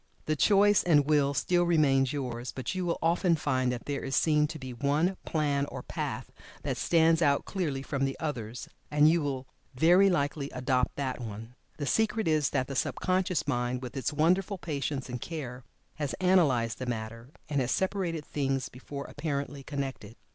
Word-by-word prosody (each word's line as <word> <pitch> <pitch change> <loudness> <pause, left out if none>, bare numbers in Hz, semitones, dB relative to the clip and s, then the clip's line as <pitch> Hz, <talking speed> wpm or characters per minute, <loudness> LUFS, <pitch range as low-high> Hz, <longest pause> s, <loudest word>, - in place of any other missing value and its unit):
The 155 - +1
choice 205 +4 +5
and 150 -5 +4
will 145 -2 +3
still 175 +8 +2
remains 140 -6 +3
yours, 125 -4 -4
but 130 +2 -4
you 185 -1 -2
will 170 - 0
often 170 +1 +3
find 130 -5 0
that 120 -1 -5
there 145 -1 -3
is 135 0 -2
seen 150 -1 +3
to 160 +1 -7
be 130 -3 -7
one 145 +9 +1
plan 145 -3 0
or - - -7
path - - -4 0.3
that - - -2
stands 165 -1 +3
out 140 -3 +3
clearly 150 -9 -2
from 140 -1 -2
the 135 - -3
others, 125 -7 -4 0.2
and 150 0 +5
you 165 +1 +4
will 135 -3 -3 0.3
very 175 +8 +5
likely 145 -4 -1
adopt 125 0 0
that 130 -3 -3
one. 115 +1 -7 0.2
The 145 - -3
secret 220 - +1
is 155 -3 +2
that 135 -2 0
the 135 - -6
sub - - 0
conscious 185 -4 0
mind 125 -1 -1
with 125 - -7
its 135 +2 -1
wonderful 180 +6 +2
patience 145 -4 -3
and 125 -2 -5
care 130 -7 -6 0.3
has 145 -3 -2
analyzed 150 -12 +2
the 130 - -4
matter, 115 +1 -5 0.2
and 145 -2 0
has 125 - -1
separated 180 -4 -1
things 135 -2 -1
before 140 +2 -8
apparently 145 -2 -4
connected. 135 -6 -5
145 Hz, 185 wpm, -29 LUFS, 130-165 Hz, 0.3 s, choice